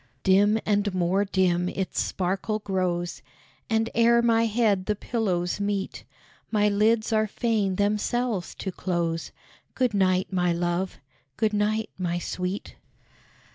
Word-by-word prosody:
Dim 205 +3 +4
and 205 -2 +1
more 185 +3 +1
dim 180 -2 +1
its 190 0 -2
sparkle 195 +4 -1
grows, 185 -4 -2 0.5
And 225 0 +2
ere 235 0 +4
my 230 -1 +3
head 210 -4 +1
the 210 - +1
pillows 190 -6 -1
meet, 200 -1 -3 0.4
My 210 -2 +2
lids 215 +2 +2
are 215 0 +2
fain 210 -3 0
themselves 210 0 -1
to 190 - -4
close. 170 -2 -2 0.4
Good 250 -3 +1
night, 185 -1 +1
my 180 -2 +2
love! 175 +2 -1 0.4
good 215 -1 +1
night, 215 +1 0
my 175 -1 -1
sweet! 180 +3 -4
200 Hz, 130 wpm, -26 LUFS, 185-215 Hz, 0.5 s, Dim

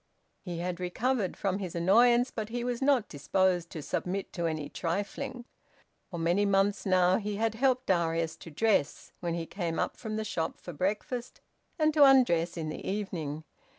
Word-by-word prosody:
He 175 -3 -5
had 175 +1 -3
recovered 200 +3 -1
from 195 0 -1
his 185 -4 -5
annoyance, 235 +8 +4
but 220 -1 -4
he 240 +1 -3
was 245 0 -2
not 270 -5 +3
disposed 175 +4 0
to 155 - -7
submit 190 +6 -3
to 170 -1 -1
any 155 -2 -3
trifling. 220 +8 -4 0.6
For 175 - -6
many 170 +4 +2
months 200 +1 +2
now 185 0 +4
he 210 -1 -3
had 225 +1 0
helped 255 +2 +1
Darius 165 -4 +1
to - - -11
dress, 165 -2 0
when 170 -1 -2
he 170 -1 -3
came 170 -2 -3
up - - -1
from 220 -2 -5
the 220 0 -2
shop 165 -5 -2
for 175 - -8
breakfast, 210 - -3 0.4
and 310 -1 +3
to 295 -1 +6
undress 210 -12 +5
in 160 -2 -3
the 155 - -6
evening. 165 -7 -3
190 Hz, 180 wpm, -29 LUFS, 170-225 Hz, 0.6 s, to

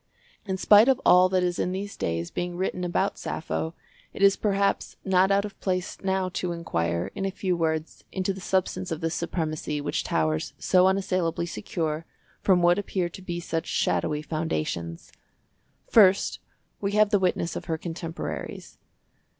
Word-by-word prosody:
In 190 -1 -1
spite 210 +4 +7
of 265 -1 +4
all 180 +1 +7
that 185 -1 +2
is 175 -1 -1
in 180 - 0
these 200 +2 -4
days 85 +1 -2
being 175 0 -3
written 185 0 -2
about 185 +3 0
Sappho, 160 +1 -3 0.4
it 195 - -1
is 195 0 +7
perhaps 200 -1 0
not 190 0 +4
out 200 +1 +3
of 205 - -10
place 185 -1 -2
now 190 -1 +1
to 180 -1 -2
inquire, 85 - -2
in 195 - -4
a 195 - +1
few 190 -2 -1
words, 160 -1 -2
into 190 0 -1
the 190 - -9
substance 185 -1 -1
of 160 +1 -3
this 165 0 -1
supremacy 155 -3 -2
which 145 0 -2
towers 80 -1 0
so 185 0 +4
unassailably 185 -3 0
secure 165 -4 -3 0.3
from 180 -3 +3
what 175 +2 +5
appear 185 -3 -2
to 180 - -11
be 175 -2 -4
such 165 -1 -3
shadowy 150 0 0
foundations. 85 - -3 0.8
First, 195 -3 +5 0.4
we 200 0 -2
have 210 -1 +4
the 205 - +4
witness 180 -2 0
of - - -5
her 160 -1 -1
contemporaries. 165 0 -6
180 Hz, 165 wpm, -26 LUFS, 160-190 Hz, 0.8 s, spite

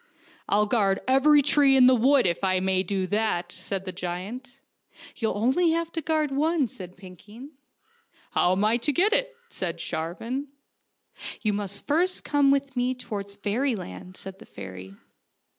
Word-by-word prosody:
" - - -26
I'll 210 +1 +3
guard 205 -3 +1
every 285 +3 +5
tree 280 -1 +4
in 255 - +7
the 255 - +7
wood, 260 +2 +4
if 175 +1 -1
I 185 -1 +2
may 190 0 +1
do 190 0 -2
that," 185 -3 -1
said 190 +1 -6
the 185 - -4
giant. 190 +9 -6 0.3
" - - -18
You'll 225 +1 0 0.2
have 335 0 -2
to 325 - -3
guard 310 -2 0
only 275 - -1
one," 315 -3 +2
said 185 -4 -9
Pinkeen. 205 - -13 0.4
" - - -34
How 175 - +2
am 195 +3 +1
I 225 +2 +3
to 245 +5 0
get 375 +10 +3
to - - +5
it? - - -7
" - - -36
said - - -4
Sharvan. 225 - -4 0.5
" - - -12
You 210 -2 +1
must 200 -1 -4
first 350 +5 +1
come 285 -2 +2
with 275 -1 +1
me 250 +1 0
towards 200 -5 -6
fairy 225 +6 -1
land," 180 - -9
said 190 0 -10
the - - -14
fairy. 95 +1 -10
220 Hz, 190 wpm, -26 LUFS, 190-275 Hz, 0.5 s, in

